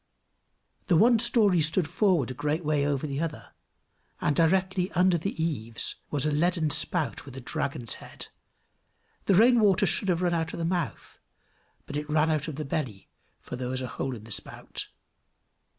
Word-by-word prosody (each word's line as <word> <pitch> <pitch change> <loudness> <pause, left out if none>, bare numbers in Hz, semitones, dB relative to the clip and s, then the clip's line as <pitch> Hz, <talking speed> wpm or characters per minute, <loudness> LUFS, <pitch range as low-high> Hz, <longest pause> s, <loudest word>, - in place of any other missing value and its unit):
The 180 - +3
one 230 +6 +5
story 205 -7 +4
stood 160 +2 +3
forward 175 - +1
a - - -4
great 150 +5 -2
way 145 -2 +1
over 145 0 -1
the 140 -1 -3
other; 165 -2 -5 0.7
and 150 - 0
directly 185 +3 +1
under 180 0 +3
the 170 +2 -3
eaves 120 -9 -1
was 145 -1 -1
a 150 - +1
leaden 160 0 +1
spout 160 +1 0
with 135 -2 -11
a - - -4
dragon's 125 -2 -3
head; - - -9 1.0
the 195 - +3
rain 235 +5 +6
water 200 -2 +4
should 195 +2 +1
have 180 0 +1
run 175 -1 +1
out 165 -1 -1
of - - -5
the 165 - -2
mouth, 175 -3 -3 0.7
but 145 - -8
it 150 0 -4
ran 155 +1 +2
out 155 -1 -1
of 155 - -5
the 155 +1 -5
belly, 130 -8 -4 0.3
for - - -8
there 125 0 -4
was 130 0 -2
a - - -3
hole 130 +1 -4
in 110 - -11
the 110 - -13
spout. 100 0 -5
160 Hz, 185 wpm, -27 LUFS, 140-180 Hz, 1.0 s, rain